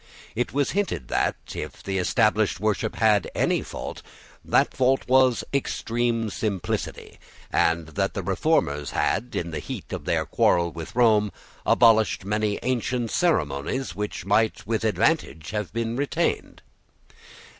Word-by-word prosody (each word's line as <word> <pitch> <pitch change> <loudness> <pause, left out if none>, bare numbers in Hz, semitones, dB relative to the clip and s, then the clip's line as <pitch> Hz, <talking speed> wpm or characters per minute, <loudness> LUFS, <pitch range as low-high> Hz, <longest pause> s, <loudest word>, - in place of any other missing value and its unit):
It 125 - -1
was 140 0 0
hinted 170 - -2
that, - - +1 0.2
if - - -7
the 95 -1 -1
established 105 +1 +2
worship 110 +1 -1
had 105 -3 +3
any - - +1
fault, - - -7 0.4
that - - +2
fault 130 +1 +2
was 130 -1 +4
extreme 115 -4 -1
simplicity, 100 -4 -3 0.3
and 80 -1 +1
that 95 +5 -2
the 100 - -3
Reformers 90 - +1
had, 120 +5 -1
in 85 0 -2
the 80 - -3
heat - - -7
of - - -5
their - - +1
quarrel 85 -1 +2
with 80 +4 -8
Rome, 110 -4 +4 0.4
abolished 110 -6 +4
many 105 0 0
ancient 125 -1 -1
ceremonies 130 - 0
which 105 -4 -4
might 105 +2 +1
with 110 +1 -1
advantage 95 -6 0
have 105 -3 -3
been 115 +1 -2
retained. 140 +2 -1
110 Hz, 135 wpm, -25 LUFS, 95-120 Hz, 0.4 s, was